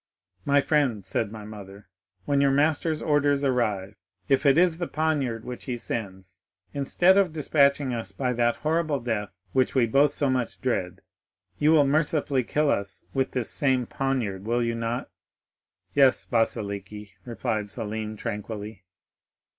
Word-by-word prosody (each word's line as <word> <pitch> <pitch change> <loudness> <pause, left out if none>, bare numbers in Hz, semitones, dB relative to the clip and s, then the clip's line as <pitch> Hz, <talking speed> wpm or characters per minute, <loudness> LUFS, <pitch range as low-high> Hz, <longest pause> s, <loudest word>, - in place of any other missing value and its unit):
'—'My 140 0 +4
friend,' 135 - +1
said 100 +2 -2
my 110 -1 -8
mother, 100 -1 -11 0.4
'when 140 -1 +2
your 140 - +4
master's 155 +3 +1
orders 145 -1 +2
arrive, 105 -7 0 0.3
if 135 +1 +2
it 140 - +5
is 175 -1 +3
the 175 - -2
poniard 140 -7 -1
which 125 -1 -7
he 125 -2 -3
sends, 95 -6 -6 0.3
instead 175 +7 +3
of 190 -4 +2
despatching 140 -3 +2
us 115 -5 -4
by 125 +5 -1
that 120 0 +1
horrible 155 -2 +1
death 110 -4 -2 0.2
which 130 0 +1
we 130 -3 +4
both 140 +5 +3
so 145 - 0
much 130 -3 -1
dread, 95 -8 -2 0.6
you 150 +1 +4
will 150 -3 +5
mercifully 145 -2 +1
kill 150 +4 +1
us 100 -1 -3
with 130 -1 -1
this 125 -3 -2
same 130 -3 +1
poniard, 120 -8 -2
will 120 +2 0
you 115 0 0
not?'—'Yes, 120 +3 -2
Vasiliki,' 105 -3 -2
replied 110 -2 -3
Selim 110 +1 -4
tranquilly. 105 -1 -6
125 Hz, 145 wpm, -26 LUFS, 110-145 Hz, 0.6 s, it